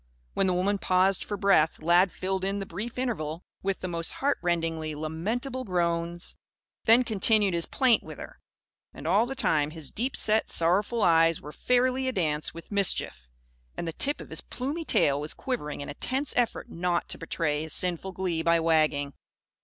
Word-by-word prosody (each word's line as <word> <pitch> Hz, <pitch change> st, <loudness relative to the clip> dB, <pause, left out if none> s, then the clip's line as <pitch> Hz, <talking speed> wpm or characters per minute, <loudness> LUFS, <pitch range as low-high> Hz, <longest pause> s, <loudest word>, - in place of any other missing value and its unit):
When 195 Hz, -, +1 dB
the 185 Hz, -, +2 dB
woman 195 Hz, +3 st, +1 dB
paused 185 Hz, +1 st, +2 dB
for 205 Hz, -, -4 dB
breath, 190 Hz, -6 st, +3 dB
Lad 175 Hz, +3 st, +4 dB
filled 190 Hz, 0 st, -3 dB
in 195 Hz, +1 st, -1 dB
the 195 Hz, -, -4 dB
brief 210 Hz, +8 st, -6 dB
interval 175 Hz, -11 st, -3 dB, 0.2 s
with 195 Hz, 0 st, -2 dB
the 185 Hz, -, -3 dB
most 170 Hz, -1 st, -1 dB
heartrendingly 165 Hz, -, -1 dB
lamentable 215 Hz, -, -3 dB
groans; 170 Hz, -2 st, -1 dB, 0.5 s
then 230 Hz, +3 st, +6 dB
continued 215 Hz, -3 st, +3 dB
his 170 Hz, -1 st, -1 dB
plaint 255 Hz, -4 st, +3 dB
with -, -, -10 dB
her. -, -, -10 dB, 0.6 s
And -, -, -10 dB
all 220 Hz, +4 st, +3 dB
the 270 Hz, -, -5 dB
time, 150 Hz, -, +1 dB
his 155 Hz, -3 st, -2 dB
deep 255 Hz, +5 st, -2 dB
set, 220 Hz, 0 st, +2 dB
sorrowful 200 Hz, +7 st, +2 dB
eyes 165 Hz, -1 st, +4 dB
were 150 Hz, -, -9 dB
fairly 255 Hz, +6 st, +1 dB
a -, -, +1 dB
dance 155 Hz, -8 st, -1 dB
with 165 Hz, +4 st, -12 dB
mischief, 195 Hz, -, 0 dB, 0.5 s
and 170 Hz, -, -4 dB
the 165 Hz, -, -3 dB
tip 285 Hz, -, -1 dB
of -, -, -11 dB
his -, -, -1 dB
plumy 290 Hz, +6 st, -4 dB
tail 140 Hz, -, +2 dB
was 150 Hz, -, -5 dB
quivering 190 Hz, -, -4 dB
in 145 Hz, -, -6 dB
a -, -, -5 dB
tense 265 Hz, -, -2 dB
effort 245 Hz, -1 st, 0 dB
not 175 Hz, 0 st, -1 dB
to -, -, -2 dB
betray 150 Hz, -2 st, -1 dB
his 160 Hz, 0 st, -4 dB
sinful 180 Hz, +1 st, 0 dB
glee 180 Hz, -3 st, -2 dB
by 170 Hz, 0 st, +3 dB
wagging. 155 Hz, -3 st, +1 dB
180 Hz, 185 wpm, -27 LUFS, 165-220 Hz, 0.6 s, then